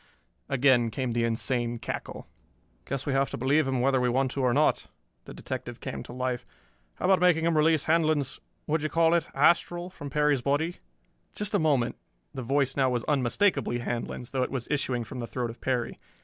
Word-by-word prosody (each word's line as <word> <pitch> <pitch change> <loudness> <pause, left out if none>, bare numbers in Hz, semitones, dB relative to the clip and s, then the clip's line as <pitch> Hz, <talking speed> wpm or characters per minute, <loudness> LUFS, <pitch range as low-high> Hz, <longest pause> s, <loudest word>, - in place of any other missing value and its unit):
Again 130 -3 +4
came 130 +1 -2
the 115 0 +1
insane 120 +1 -1
cackle. - - -6 0.6
"Guess 135 0 -4
we 140 - 0
have 135 0 +2
to - - -5
believe 135 +4 +2
him 130 -2 0
whether 130 0 +2
we 125 - +2
want 130 +1 +1
to 140 - -3
or 125 -1 +3
not." 150 +5 +2 0.4
The - - -9
detective - - -6
came - - -5
to - - -10
life. 125 0 -2 0.5
"How - - -4
about 190 0 +4
making 170 -2 +3
him 170 -1 +2
release 155 -1 +3
Handlon's 155 -4 +1 0.3
what 160 +2 +1
d'ye 155 - -1
call 165 0 +3
it? 170 -1 +1
astral 175 +4 +2
from 145 -5 -8
Perry's 150 -1 +2
body?" 145 +6 0 0.6
"Just 210 +1 -3
a 205 - +3
moment." 140 -7 +1 0.4
The 130 - -5
voice 135 +2 +1
now 135 -2 +3
was 125 -2 -1
unmistakably 145 - +1
Handlon's, 120 0 -4
though 130 - -1
it 125 - 0
was 130 -3 -4
issuing 130 -4 0
from 125 +3 -8
the 120 - -4
throat 120 -1 -3
of 115 - -16
Perry. 125 -3 -2
135 Hz, 200 wpm, -28 LUFS, 125-155 Hz, 0.6 s, Again